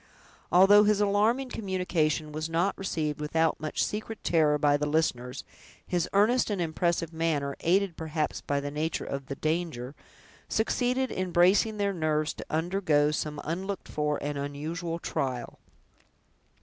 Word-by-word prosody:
Although 200 Hz, +3 st, +7 dB
his 210 Hz, -1 st, +3 dB
alarming 215 Hz, +6 st, +2 dB
communication 180 Hz, -8 st, -1 dB
was 155 Hz, +2 st, -4 dB
not 170 Hz, +4 st, +1 dB
received 155 Hz, -6 st, -3 dB
without 160 Hz, +1 st, +1 dB
much 155 Hz, 0 st, -1 dB
secret 215 Hz, +1 st, -4 dB
terror 155 Hz, -3 st, +3 dB
by 145 Hz, 0 st, +3 dB
the 150 Hz, +1 st, -1 dB
listeners, 135 Hz, -5 st, -1 dB, 0.4 s
his 175 Hz, -1 st, -1 dB
earnest 225 Hz, +6 st, +3 dB
and 205 Hz, -3 st, -1 dB
impressive 170 Hz, 0 st, -1 dB
manner, 150 Hz, -4 st, -1 dB
aided 185 Hz, +1 st, +1 dB
perhaps 160 Hz, -1 st, -2 dB
by 140 Hz, 0 st, -1 dB
the 145 Hz, 0 st, -4 dB
nature 155 Hz, +2 st, -2 dB
of 140 Hz, -1 st, -5 dB
the 140 Hz, -, -4 dB
danger, 155 Hz, -5 st, -2 dB, 0.6 s
succeeded 250 Hz, +3 st, 0 dB
in 185 Hz, 0 st, -2 dB
bracing 190 Hz, +6 st, +4 dB
their 200 Hz, -1 st, 0 dB
nerves 155 Hz, -2 st, 0 dB
to -, -, -9 dB
undergo 160 Hz, -3 st, +1 dB
some 150 Hz, -1 st, -3 dB
unlooked 190 Hz, +4 st, -4 dB
for 150 Hz, -1 st, -1 dB
and 145 Hz, 0 st, -3 dB
unusual 160 Hz, +4 st, -4 dB
trial. 130 Hz, -7 st, -3 dB
165 Hz, 145 wpm, -28 LUFS, 150-195 Hz, 0.6 s, Although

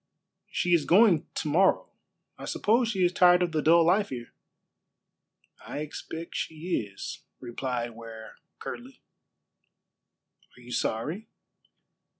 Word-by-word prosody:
"She 175 Hz, -, 0 dB
is 165 Hz, -4 st, +3 dB
going 185 Hz, -3 st, +5 dB
to -, -, -2 dB
morrow. 180 Hz, +6 st, +3 dB, 0.5 s
I -, -, -9 dB
suppose 230 Hz, +3 st, +2 dB
she 195 Hz, -5 st, +1 dB
is 175 Hz, -, +2 dB
tired 180 Hz, 0 st, +5 dB
of 175 Hz, -, -1 dB
the 155 Hz, -1 st, 0 dB
dull 165 Hz, +2 st, +5 dB
life 195 Hz, +4 st, +3 dB
here." 120 Hz, -3 st, -7 dB, 1.3 s
"I 145 Hz, -, -5 dB
expect 160 Hz, +2 st, -7 dB
she 160 Hz, -, -2 dB
is," 100 Hz, -, -7 dB, 0.2 s
replied 120 Hz, -1 st, -4 dB
Ware 115 Hz, -1 st, -11 dB, 0.2 s
curtly. -, -, -9 dB, 1.5 s
"Are -, -, -15 dB
you 120 Hz, 0 st, -12 dB
sorry?" 155 Hz, -, -2 dB
160 Hz, 125 wpm, -28 LUFS, 125-180 Hz, 1.5 s, going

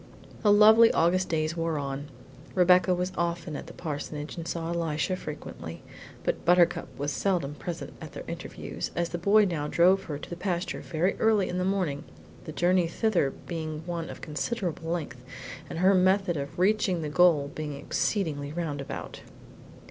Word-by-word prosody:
The 210 Hz, -, +4 dB
lovely 220 Hz, +2 st, +8 dB
August 180 Hz, +3 st, +2 dB
days 155 Hz, 0 st, 0 dB
wore 165 Hz, -2 st, -1 dB
on. 140 Hz, 0 st, -4 dB, 0.5 s
Rebecca 180 Hz, 0 st, +5 dB
was 180 Hz, +1 st, -2 dB
often 170 Hz, -2 st, -2 dB
at -, -, -7 dB
the -, -, -10 dB
parsonage 150 Hz, -1 st, -5 dB
and 165 Hz, -1 st, -6 dB
saw 165 Hz, 0 st, -3 dB
Elisha 165 Hz, 0 st, -1 dB
frequently, 145 Hz, -, -8 dB, 0.4 s
but -, -, -1 dB
Buttercup 175 Hz, 0 st, +4 dB
was 145 Hz, +1 st, -2 dB
seldom 170 Hz, -5 st, 0 dB
present 165 Hz, +3 st, -6 dB
at -, -, -9 dB
their -, -, -7 dB
interviews, -, -, -5 dB
as 170 Hz, 0 st, 0 dB
the 175 Hz, -, -4 dB
boy 205 Hz, +4 st, +5 dB
now 160 Hz, -6 st, -2 dB
drove 185 Hz, +5 st, +4 dB
her 150 Hz, -3 st, -4 dB
to -, -, -9 dB
the -, -, -3 dB
pasture 180 Hz, -1 st, -2 dB
very 170 Hz, +4 st, 0 dB
early 215 Hz, -3 st, +3 dB
in 180 Hz, -, -2 dB
the -, -, 0 dB
morning, 180 Hz, -7 st, -1 dB, 0.4 s
the -, -, -6 dB
journey 175 Hz, +2 st, +2 dB
thither 180 Hz, -5 st, +1 dB, 0.2 s
being 160 Hz, -2 st, -4 dB
one 170 Hz, -2 st, -4 dB
of -, -, -9 dB
considerable 165 Hz, 0 st, -3 dB
length 160 Hz, -7 st, -3 dB, 0.5 s
and -, -, -5 dB
her 185 Hz, +3 st, +5 dB
method 185 Hz, -1 st, +3 dB
of 140 Hz, -1 st, -5 dB
reaching 185 Hz, -2 st, +2 dB
the -, -, -2 dB
goal 150 Hz, -3 st, +4 dB
being 150 Hz, -2 st, -4 dB
exceedingly 145 Hz, -1 st, -1 dB
roundabout. 150 Hz, -4 st, -5 dB
170 Hz, 170 wpm, -28 LUFS, 150-185 Hz, 0.5 s, lovely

